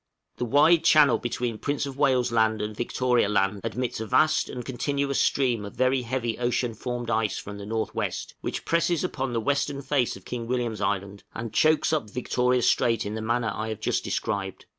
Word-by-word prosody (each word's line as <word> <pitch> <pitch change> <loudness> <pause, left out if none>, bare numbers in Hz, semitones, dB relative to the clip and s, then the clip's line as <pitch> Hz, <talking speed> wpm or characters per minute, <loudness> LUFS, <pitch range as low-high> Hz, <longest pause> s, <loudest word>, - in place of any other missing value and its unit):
The 125 - -1
wide 150 +7 +5
channel 145 -7 +5
between 120 -2 -3
Prince 145 0 -1
of 135 -1 -6
Wales' 130 -4 +2
Land 110 -1 +2
and 105 +1 -4
Victoria 120 -1 +1
Land 100 -1 +1
admits 120 +1 -3
a 110 - -4
vast 155 +6 +3
and 125 -1 -6
continuous 140 +1 -1
stream 125 -6 +1
of 100 - -8
very 130 0 +2
heavy 120 -2 -2
ocean 120 -1 0
formed 120 +1 -4
ice 110 -2 0
from 100 0 -7
the 100 - -8
N.W., 110 +1 -2 0.3
which - - -4
presses 170 0 +1
upon 135 -7 -2
the 115 - 0
western 140 +3 -1
face 130 -2 0
of 95 - -14
King 120 -2 -5
William's 120 -4 -2
Island, 100 0 -2
and 115 -2 -5
chokes 155 +3 +3
up 145 -9 -1
Victoria 125 +1 0
Strait 115 0 +2
in 105 - -4
the 110 - -4
manner 115 0 0
I 110 - -4
have 110 - -4
just - - -1
described. 95 -2 -3
120 Hz, 195 wpm, -26 LUFS, 110-135 Hz, 0.3 s, wide